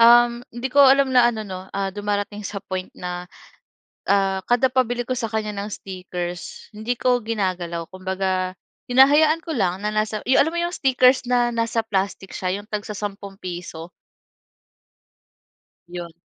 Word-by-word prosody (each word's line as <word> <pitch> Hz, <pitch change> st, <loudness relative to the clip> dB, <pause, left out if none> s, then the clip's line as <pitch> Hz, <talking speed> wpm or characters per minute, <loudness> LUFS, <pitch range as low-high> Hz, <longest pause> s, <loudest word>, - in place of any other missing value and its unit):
uhm, 240 Hz, +1 st, +6 dB
hindi 240 Hz, +3 st, -3 dB
ko 285 Hz, -, 0 dB
alam 270 Hz, 0 st, +5 dB
na 245 Hz, -1 st, +6 dB
ano 220 Hz, -2 st, -5 dB
'no, 185 Hz, -1 st, -6 dB
ah, 195 Hz, 0 st, -1 dB
dumarating 205 Hz, 0 st, -3 dB
sa 200 Hz, -1 st, -5 dB
point 185 Hz, -1 st, -5 dB
na, 180 Hz, 0 st, -5 dB, 0.8 s
ah, 195 Hz, -1 st, +3 dB
kada 245 Hz, +2 st, +3 dB
pabili 245 Hz, -2 st, +1 dB
ko 255 Hz, -, -1 dB
sa 230 Hz, -, -1 dB
kanya 215 Hz, -1 st, -1 dB
ng 200 Hz, +1 st, -4 dB
stickers 180 Hz, -2 st, -6 dB
hindi 220 Hz, +4 st, -2 dB
ko 250 Hz, 0 st, +2 dB
ginagalaw. 185 Hz, -6 st, -2 dB
Kumbaga 185 Hz, 0 st, -2 dB, 0.4 s
hinahayaan 295 Hz, +5 st, +6 dB
ko 325 Hz, -, -4 dB
lang 190 Hz, -3 st, 0 dB
na 210 Hz, -, +1 dB
nasa 215 Hz, 0 st, -1 dB
'yong 260 Hz, -, +5 dB
alam 320 Hz, -, -2 dB
mo 345 Hz, -, -1 dB
'yong 345 Hz, +1 st, -2 dB
stickers 260 Hz, -1 st, +4 dB
na 245 Hz, -1 st, +3 dB
nasa 230 Hz, 0 st, 0 dB
plastic 195 Hz, -2 st, -2 dB
siya 185 Hz, +1 st, -2 dB
'yong 210 Hz, -, -16 dB
tagsasampung 205 Hz, -1 st, -5 dB
piso? 175 Hz, -2 st, -7 dB, 2.0 s
'Yon. 175 Hz, -1 st, -6 dB
210 Hz, 155 wpm, -23 LUFS, 185-245 Hz, 2.0 s, uhm